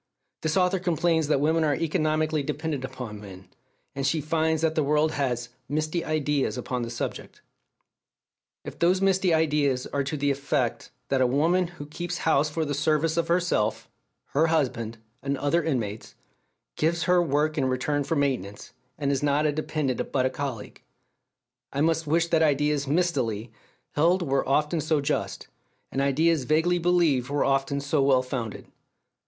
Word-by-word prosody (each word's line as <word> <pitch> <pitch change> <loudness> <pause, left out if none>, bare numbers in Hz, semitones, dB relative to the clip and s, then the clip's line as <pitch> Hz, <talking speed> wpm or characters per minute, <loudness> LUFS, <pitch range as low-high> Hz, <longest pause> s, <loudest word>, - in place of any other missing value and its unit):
This 160 +2 0
author 185 0 +2
complains 170 -3 +1
that 145 -2 +2
women 160 +3 +2
are 150 -2 +2
economically 155 0 0
dependent 150 -1 -3
upon 115 -5 -7
men; 95 -2 -12 0.4
and 135 - -4
she 155 +3 +1
finds 160 +1 0
that 160 -1 +2
the 160 - +1
world 150 +2 +2
has 125 -5 -2 0.2
"misty 155 +3 -1
ideas 150 -4 0
upon 125 0 -3
the 115 - -3
subject." 120 - -6 1.2
If - - -8
those 180 +2 +3
misty 190 -1 +2
ideas 150 -5 +2
are 140 - -2
to 150 +2 -3
the 145 0 +1
effect 140 -3 -1 0.2
that 135 -1 +2
a 130 - +4
woman 165 +8 +2
who 145 - -7
keeps 175 +4 -5
house 150 -2 +3
for 160 +1 -2
the 145 - -2
service 155 +2 +1
of 170 -1 0
herself, 170 -11 0 0.4
her 155 +4 +2
husband, 125 -8 -1 0.2
and 140 0 -1
the 135 - -8
other 165 +4 +2
inmates, 115 -9 -3 0.6
gives 165 +2 +1
her 180 -1 +4
work 150 -1 +1
in 135 - +1
return 130 +3 0
for 165 - -1
maintenance, 125 -9 -2 0.2
and 140 -2 0
is 135 - 0
not 145 +1 +2
a 150 - +3
dependent 150 -3 -2
but 130 -2 +1
a 130 - +1
colleague, 130 -7 -6 0.9
I 140 - -2
must 160 0 +1
wish 165 +3 +2
that 165 -1 +3
ideas 150 -1 +2
"mistily" 130 - 0 0.4
held 175 +5 +2
were 135 -3 0
often 150 +3 +1
so 155 0 +1
just, 140 - -2 0.4
and 135 - -1
ideas 145 +1 +2
vaguely 165 +5 +2
believed 165 -8 +2
were 145 0 +1
often 135 +1 +1
so 140 +1 0
well 135 -2 +4
founded. 125 -4 -5
150 Hz, 170 wpm, -26 LUFS, 135-160 Hz, 1.2 s, a